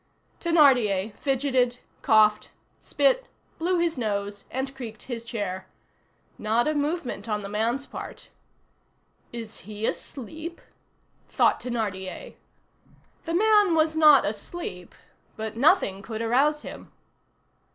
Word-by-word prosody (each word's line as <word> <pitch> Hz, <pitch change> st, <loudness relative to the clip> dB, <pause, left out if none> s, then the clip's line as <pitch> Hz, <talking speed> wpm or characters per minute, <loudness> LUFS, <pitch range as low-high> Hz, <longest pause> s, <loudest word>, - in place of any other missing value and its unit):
Thénardier 245 Hz, -, +4 dB
fidgeted, 260 Hz, -3 st, +1 dB, 0.2 s
coughed, 215 Hz, -1 st, +4 dB, 0.3 s
spit, -, -, +2 dB, 0.3 s
blew 355 Hz, +2 st, +1 dB
his 340 Hz, -5 st, 0 dB
nose, 205 Hz, -2 st, -3 dB
and 265 Hz, +1 st, -4 dB
creaked 235 Hz, -4 st, -8 dB
his 235 Hz, -3 st, -5 dB
chair. 205 Hz, -6 st, -4 dB, 0.7 s
Not 225 Hz, +4 st, +1 dB
a 305 Hz, -, +2 dB
movement 295 Hz, -5 st, -2 dB
on 210 Hz, -1 st, -1 dB
the -, -, -5 dB
man's 230 Hz, +7 st, -1 dB
part. -, -, -9 dB, 1.0 s
"Is 230 Hz, -2 st, -7 dB
he 210 Hz, +1 st, -4 dB
asleep?" 315 Hz, +10 st, -5 dB, 0.7 s
thought -, -, +3 dB
Thénardier. 205 Hz, -6 st, -4 dB, 0.9 s
The 330 Hz, -, -1 dB
man 415 Hz, -2 st, +4 dB
was 315 Hz, 0 st, +2 dB
not 305 Hz, -3 st, +7 dB
asleep, 205 Hz, -, -6 dB, 0.4 s
but 220 Hz, 0 st, -4 dB
nothing 240 Hz, -, +3 dB
could 220 Hz, +2 st, -5 dB
arouse 280 Hz, +6 st, +2 dB
him. -, -, -9 dB
245 Hz, 110 wpm, -26 LUFS, 215-310 Hz, 1.0 s, not